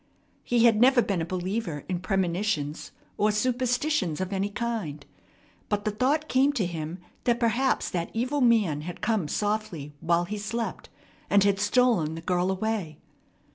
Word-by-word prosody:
He 240 -1 +3
had 225 -2 +5
never 250 -1 +6
been 195 -4 -1
a - - -1
believer 185 -3 -3
in 180 -2 -2
premonitions 185 -4 -1 0.3
or 210 +1 +3
superstitions 245 - 0
of 185 +1 -3
any 195 +1 0
kind. 205 - -4 0.6
But 205 -1 -1
the 215 - +1
thought 275 +8 +1
came 270 +2 +3
to 220 -9 0
him 165 -1 -4 0.3
that 240 -1 +2
perhaps 240 +3 +1
that 170 -2 -2
evil 255 +5 -1
man 215 - +3
had 175 +3 -7
come 215 -8 0
softly 205 -7 -2
while 170 +2 +1
he 210 +3 -5
slept, 225 +3 -4 0.4
and 200 -1 +5
had 200 -1 +2
stolen 205 -8 +2
the 165 - -6
girl 180 +2 0
away. 190 -5 -2
205 Hz, 160 wpm, -27 LUFS, 175-235 Hz, 0.6 s, never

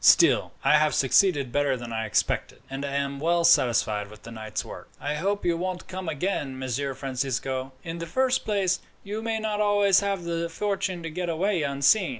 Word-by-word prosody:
Still, - - +5
I 150 +3 +5
have 155 0 +2
succeeded 140 -1 +3
better 145 -1 +1
than 120 -1 -7
I 110 0 -2
expected, 100 - -1
and 135 +1 -4
I 140 -1 -3
am 140 0 -1
well 170 +3 +2
satisfied 115 -10 +3
with 105 0 -14
the 115 - -9
night's 110 -1 -5
work." - - -10
"I 145 - -2
hope 195 +7 -1
you 170 -1 +2
won't 180 +1 -4
come 185 -2 -5
again, 145 -4 -2
Messer 130 +1 -2
Francisco. 130 0 -3
In 170 0 -5
the 170 - -5
first 260 +7 +1
place, 195 -3 +1 0.2
you 210 +2 -4
may 225 0 -1
not 215 -1 -1
always 205 -2 +4
have 200 -3 -2
the 170 0 -2
fortune 190 -1 -2
to 165 - -5
get 175 +2 -3
away 180 +2 0
unseen. 140 +7 +3
165 Hz, 195 wpm, -26 LUFS, 135-190 Hz, 0.2 s, Still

